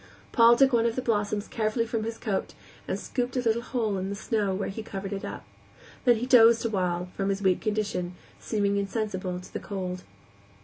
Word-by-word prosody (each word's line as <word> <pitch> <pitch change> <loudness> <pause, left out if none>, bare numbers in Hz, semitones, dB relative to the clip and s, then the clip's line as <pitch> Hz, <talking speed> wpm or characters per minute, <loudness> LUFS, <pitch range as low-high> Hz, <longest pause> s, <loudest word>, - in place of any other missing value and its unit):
Paul 235 -1 +7
took 270 +1 +4
one 235 0 +4
of 230 - -1
the 255 - -1
blossoms 205 -2 0
carefully 225 +1 0
from 225 -1 -2
his 225 0 -4
coat 205 -4 -3 0.3
and - - -2
scooped 250 0 -2
a - - +2
little 230 -1 +1
hole 225 -5 -1
in 190 +1 -3
the 200 - -3
snow, 210 -2 -1
where 195 - -2
he 210 +3 -5
covered 195 -2 -5
it 195 - -4
up. - - -6 0.6
Then 245 -1 +6
he 230 +2 -2
dozed 235 -2 +6
awhile, 180 -4 -1
from 195 0 -1
his 195 0 -1
weak 185 -2 +3
condition, 205 -5 -2 0.2
seemingly 200 -2 0
insensible 195 -3 -2
to 180 - -13
the - - -3
cold. 185 -2 -4
215 Hz, 205 wpm, -27 LUFS, 195-230 Hz, 0.6 s, Paul